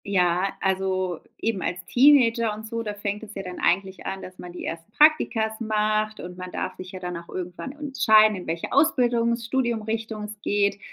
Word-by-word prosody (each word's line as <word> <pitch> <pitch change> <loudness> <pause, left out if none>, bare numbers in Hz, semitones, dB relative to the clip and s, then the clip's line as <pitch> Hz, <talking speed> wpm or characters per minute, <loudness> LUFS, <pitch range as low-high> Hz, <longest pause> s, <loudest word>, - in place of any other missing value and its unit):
Ja, 185 -1 +1
also 185 -2 0 0.2
eben 220 -4 -1
als 175 0 -3
Teenager 235 -3 +5
und 215 +1 -9
so, 230 +1 -3
da 210 -2 -4
fängt 205 0 -3
es 215 -1 -10
ja 195 - -4
dann 180 -1 -7
eigentlich 190 +1 0
an, 195 0 -4
dass 185 0 -11
man 180 - -8
die 180 - -7
ersten 165 +5 -6
Praktika 225 -8 +3
macht, 215 -1 0
und 180 0 -8
man 185 0 -7
darf - - -4
sich 185 0 -9
ja 185 - -7
dann 180 -1 -4
auch 170 0 -11
irgendwann 180 +8 -6
entscheiden, 220 -8 +4
in 185 - -8
welche 165 +1 -3
Ausbildungs, 240 -4 +2
Studium-Richtung 225 -3 -2
es 210 0 -8
geht. 200 -1 +1
210 Hz, 190 wpm, -25 LUFS, 185-230 Hz, 0.2 s, Teenager